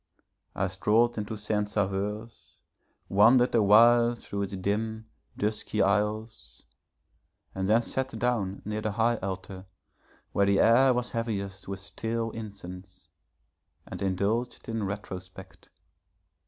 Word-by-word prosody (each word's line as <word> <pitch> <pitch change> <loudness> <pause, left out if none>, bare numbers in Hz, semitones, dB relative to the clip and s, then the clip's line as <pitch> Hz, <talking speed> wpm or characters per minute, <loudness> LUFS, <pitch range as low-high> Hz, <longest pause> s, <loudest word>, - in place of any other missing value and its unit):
I 100 - 0
strolled 110 +5 +2
into 105 +1 -4
Saint 105 0 -1
Sauveur's, 105 +2 -3 0.5
wandered 115 +6 +5
a 115 - +4
while 120 +3 +6
through 100 -3 -6
its 100 0 -3
dim, 110 +3 -2 0.3
dusky 105 0 -2
aisles, 105 +3 -1 0.9
and 95 0 -2
then 115 +2 +4
sat 130 -1 -3
down 110 -5 -1
near 105 +1 -3
the 110 -1 -2
high 115 +2 +2
altar, 95 -1 -6 0.6
where 100 0 +2
the 100 -1 +3
air 125 +4 +6
was 125 0 -2
heaviest 100 -5 -4
with 95 -1 -5
stale 115 +3 -3
incense, 95 -4 -9 0.8
and - - -8
indulged 100 +6 -1
in 115 -3 -2
retrospect. 95 -3 -8
105 Hz, 120 wpm, -28 LUFS, 100-115 Hz, 0.9 s, while